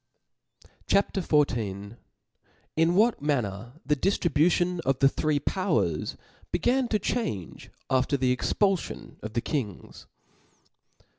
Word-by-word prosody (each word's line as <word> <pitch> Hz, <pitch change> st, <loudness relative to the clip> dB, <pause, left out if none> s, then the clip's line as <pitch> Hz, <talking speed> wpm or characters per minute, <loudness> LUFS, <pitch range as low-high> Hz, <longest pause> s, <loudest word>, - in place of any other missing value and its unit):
CHAP. 200 Hz, -, +2 dB
XIV. 115 Hz, -, 0 dB, 0.8 s
Jn 165 Hz, +2 st, +3 dB
what 220 Hz, +2 st, +3 dB
manner 120 Hz, -6 st, -2 dB
the 150 Hz, +2 st, +2 dB
dijlribution 175 Hz, +1 st, +2 dB
of 135 Hz, -5 st, 0 dB
the 135 Hz, -, +5 dB
three 150 Hz, +1 st, 0 dB
Powers 155 Hz, -, -1 dB, 0.3 s
began 255 Hz, 0 st, +1 dB
to 220 Hz, -, +1 dB
change 190 Hz, -, -3 dB, 0.2 s
after 130 Hz, +2 st, +1 dB
the 125 Hz, -1 st, +2 dB
Expulfion 195 Hz, -, -1 dB
of 110 Hz, 0 st, -7 dB
the 115 Hz, -, 0 dB
Kings. 115 Hz, -, -5 dB
145 Hz, 105 wpm, -27 LUFS, 120-180 Hz, 0.8 s, the